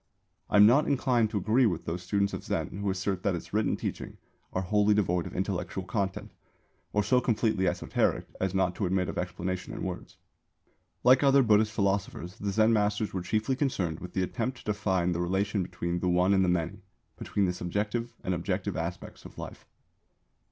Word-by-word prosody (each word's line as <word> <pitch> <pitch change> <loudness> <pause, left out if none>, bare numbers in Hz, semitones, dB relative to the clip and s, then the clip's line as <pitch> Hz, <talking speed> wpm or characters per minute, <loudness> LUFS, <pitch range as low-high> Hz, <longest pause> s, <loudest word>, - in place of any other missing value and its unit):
I - - +3
am 105 - +9
not 130 +7 +5
inclined 125 -5 +2
to 105 - -2
agree 115 +6 +3
with 85 -5 -2
those 85 +2 -3
students 100 +2 0
of - - -5
Zen - - -2
who 100 0 -1
assert 95 -1 -1
that 100 -2 0
its 85 - -8
written 110 +1 +1
teaching - - -5 0.3
are 95 - -1
wholly 105 +2 +3
devoid 90 -4 +1
of - - -9
intellectual 95 -1 -2
content 95 0 -3 0.6
or 105 - +1
so 125 +5 +3
completely 110 -5 +1
esoteric 90 +1 0
as 95 0 -1
not 95 -2 +2
to 100 - 0
admit 90 0 0
of - - -3
explanation 90 +1 -4
in - - -5
words. - - -6 0.9
Like 125 +1 +6
other 140 -1 +5
Buddhist 105 -1 +4
philosophers 100 -3 -1
the 100 - -2
Zen 110 +3 +4
masters 105 0 +1
were 95 - -2
chiefly 110 +8 0
concerned 95 - -1
with 90 -1 -9
the 95 - +1
attempt 120 +7 -3
to - - -14
define 95 -4 0
the 85 0 -1
relation 95 +3 0
between 90 -1 -3
the 90 - 0
One 90 +2 +3
and 95 -1 +4
the 90 - +2
Many, 90 +3 -1 0.3
between 100 - -1
the 90 - 0
subjective 105 +7 -3
and 95 - -1
objective 85 -1 -2
aspects - - -5
of - - -12
life. - - -9
100 Hz, 195 wpm, -29 LUFS, 90-110 Hz, 0.9 s, am